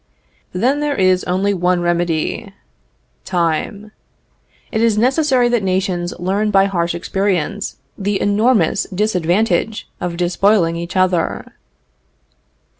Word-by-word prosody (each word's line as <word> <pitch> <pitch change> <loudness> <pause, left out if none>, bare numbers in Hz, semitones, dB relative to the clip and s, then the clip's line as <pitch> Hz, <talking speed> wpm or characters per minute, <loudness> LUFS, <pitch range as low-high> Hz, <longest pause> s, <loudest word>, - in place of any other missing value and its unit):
Then 255 +10 +1
there 295 -1 -1
is 185 -1 +2
only 190 +3 0
one 180 -1 +1
remedy 175 +4 -1 0.7
time. 180 +5 -2 0.8
It 220 - 0
is 225 -2 +2
necessary 255 +1 +3
that 240 -2 +1
nations 185 -2 -1
learn 200 +4 0
by 195 -1 +4
harsh 175 -3 -1
experience 195 +2 -2 0.2
the 200 0 -1
enormous 205 -2 +2
disadvantage 210 +3 0
of 175 -2 -4
despoiling 180 0 +2
each 170 +2 -6
other. 185 -3 0
195 Hz, 110 wpm, -18 LUFS, 175-215 Hz, 0.8 s, by